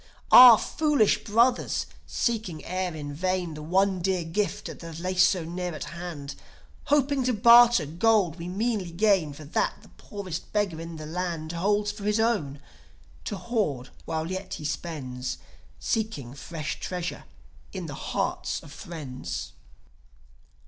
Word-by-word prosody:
Ah, 245 -3 +11
foolish 295 -8 +1
brothers, 235 +4 +2 0.2
seeking 215 -10 -2
e'er 185 -1 -3
in 145 -2 -6
vain 180 +1 -1
The 150 - -8
one 190 +4 +1
dear 185 -1 0
gift 195 +4 -2
that 165 -1 -8
liesso 185 0 +2
near 175 0 -4
at - - -5
hand; 165 -5 -7 0.5
Hoping 285 -2 +2
to 250 - +2
barter 235 -3 +7
gold 180 +1 +2
we 170 - -5
meanly 205 0 -1
gain 185 -3 +2
For 145 +2 -10
that 145 - 0
the - - -17
poorest 185 -5 -7
beggar 200 -6 -1
in 165 0 -7
the 155 -1 -7
land 165 -1 -3
Holds 205 +4 +1
for 210 -1 -10
his 210 +1 +1
own, 200 -12 0 0.7
to 205 - -3
hoard 185 - -2 0.2
while 160 +1 -3
yet 185 0 -4
he 150 - -8
spends; 135 -5 -4 0.4
Seeking 210 - -2
fresh 155 +2 -5
treasure 180 -1 -4 0.5
in 185 -3 -5
the 145 - -6
hearts - - -2
of 145 - -13
friends. 145 -4 -6
180 Hz, 140 wpm, -26 LUFS, 160-210 Hz, 0.7 s, Ah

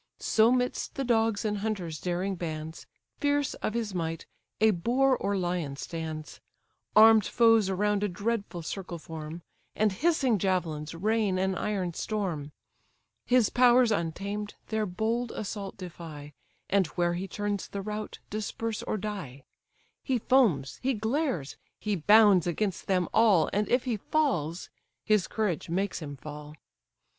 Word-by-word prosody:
So 225 +2 +3
'midst 250 0 -1
the 275 - -1
dogs 225 -3 +1
and 210 -1 -1
hunters' 195 -7 -3
daring 180 +2 -1
bands, 160 -2 -6 0.3
Fierce 290 -1 +1
of 215 - -2
his 225 -4 -2
might, 165 -2 -3 0.3
a 220 0 +5
boar 250 +9 +2
or 200 -4 -1
lion 175 -6 -2
stands; 160 -1 -6 0.6
Arm'd 220 -1 +7
foes 225 -4 +4
around 205 +2 +1
a - - +2
dreadful 200 -2 -3
circle 180 +1 -5
form, 160 +1 -8 0.3
And 215 -1 +2
hissing 260 - +2
javelins 165 -5 -1
rain 210 +1 +1
an 190 +1 +1
iron 185 -2 -2
storm: 175 -8 -3 0.8
His 245 -4 +4
powers 245 -1 +5
untamed, 200 +3 -3
their 220 -1 0
bold 225 +6 -1
assault 200 -2 -5
defy, 165 -5 -9 0.3
And 195 -3 +2
where 175 -1 +2
he 185 +3 -3
turns 205 +1 -3
the 200 -1 -5
rout 210 +1 -5
disperse 215 +1 -3
or - - -2
die: 185 -11 -6 0.6
He 260 -3 0
foams, 210 - +2
he 265 0 +1
glares, 220 - -1 0.2
he 210 -1 -1
bounds 200 0 +6
against 185 +1 -2
them 180 -3 +2
all, 205 -8 +4
And 205 +1 0
if 245 0 +3
he 245 -4 -1
falls, 190 - -1 0.3
his 210 -3 +3
courage 205 -7 -2
makes 190 +3 -1
him 145 -3 -7
fall. 150 +2 -9
200 Hz, 145 wpm, -28 LUFS, 170-220 Hz, 0.8 s, Arm'd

